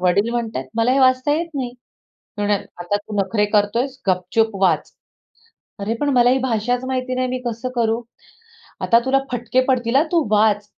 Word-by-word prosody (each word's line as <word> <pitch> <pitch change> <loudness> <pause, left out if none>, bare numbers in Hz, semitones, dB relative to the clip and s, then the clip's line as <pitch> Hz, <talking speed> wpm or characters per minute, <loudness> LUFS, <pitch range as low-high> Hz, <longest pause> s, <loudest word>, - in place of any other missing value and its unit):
...वडील 185 +4 +2
म्हणतायेत, 225 - -3
"मला, 230 +2 +3
हे 270 - +2
वाचता 255 +2 +3
येत 335 +3 -1
नाही." 255 -3 -2 0.5
ते 205 - -11
म्हणाले, 205 -1 0 0.2
"आता 175 +4 -1
तू 205 0 -7
नखरे 200 +2 +1
करतोयस 235 +6 +1
गपचूप 190 +4 +1
वाच." 190 - +2 0.9
"अरे! 200 +3 -2
पण 290 - +1
मला 245 -1 +5
ही 260 - +3
भाषाच 245 0 -1
माहिती 255 -1 -2
नाही, 255 0 0
मी 255 0 -2
कसं 235 +2 -3
करू?" 230 -1 +1 0.8
"आता 230 - +4
तुला 265 +1 +3
फटके 245 +1 +1
पडतील 245 -1 +1
हा, 280 - +6
तू 330 -5 +2
वाच." 210 -1 +3
235 Hz, 180 wpm, -20 LUFS, 210-255 Hz, 0.9 s, हा